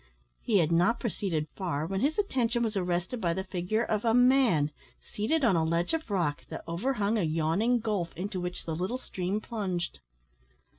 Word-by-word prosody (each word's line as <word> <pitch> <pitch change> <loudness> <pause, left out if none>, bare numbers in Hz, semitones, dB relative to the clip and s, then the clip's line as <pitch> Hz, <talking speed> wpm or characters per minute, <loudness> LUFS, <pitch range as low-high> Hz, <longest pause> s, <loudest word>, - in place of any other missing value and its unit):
He 215 - +2
had 165 -3 +3
not 175 +8 +3
proceeded 180 -9 -2
far, 165 -6 -2
when 190 +3 -2
his 295 +3 +1
attention 245 - +1
was 220 -1 -1
arrested 180 +5 -1
by 170 -2 +1
the 190 - -2
figure 185 +4 -1
of 215 -2 -1
a 225 -1 +3
man 245 - +4 0.3
seated 265 +8 -1
on 195 - +4
a 165 - +3
ledge 170 - 0
of 325 -6 -2
rock 170 -7 0
that - - -6
over 180 +11 -1
hung 215 -1 +1
a - - +2
yawning 165 +9 +2
gulf 210 -7 -1
into 185 0 -3
which 180 0 -5
the 165 - -2
little 185 +9 -2
stream 190 -4 -3
plunged. 190 - -3
195 Hz, 190 wpm, -29 LUFS, 170-230 Hz, 0.3 s, man